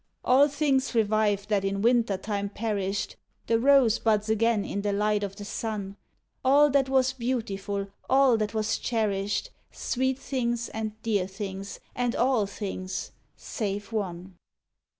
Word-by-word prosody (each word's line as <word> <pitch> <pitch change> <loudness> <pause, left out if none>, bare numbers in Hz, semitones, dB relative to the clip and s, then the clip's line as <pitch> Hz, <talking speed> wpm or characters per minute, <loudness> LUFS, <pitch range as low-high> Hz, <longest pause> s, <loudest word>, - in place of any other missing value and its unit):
All 270 +3 +6
things 280 -3 0
revive 210 -2 +2
that 205 -2 +2
in 195 +1 -1
Winter 230 -4 +3
time 200 0 -3
perished, 200 -2 -2 0.3
The 230 0 +2
rose 265 -3 +5
buds 215 -1 +1
again 220 -1 +2
in 200 - -3
the 205 0 0
light 210 +1 +1
o' - - 0
the 200 +1 -10
sun, 205 -2 -4 0.5
All 285 +2 +5
that 270 -1 +2
was 260 -1 +3
beautiful, 205 -6 -2 0.2
all 265 -2 +5
that 215 0 -2
was 220 0 0
cherished, 210 - -1 0.2
Sweet 260 +1 -1
things 240 -4 -2
and 220 0 -5
dear 205 -5 +1
things 195 0 -6 0.2
and 245 -1 0
all 240 -5 +2
things 190 -2 -5 0.2
save 205 -1 -4
one. 185 -3 -4
215 Hz, 145 wpm, -27 LUFS, 200-245 Hz, 0.5 s, All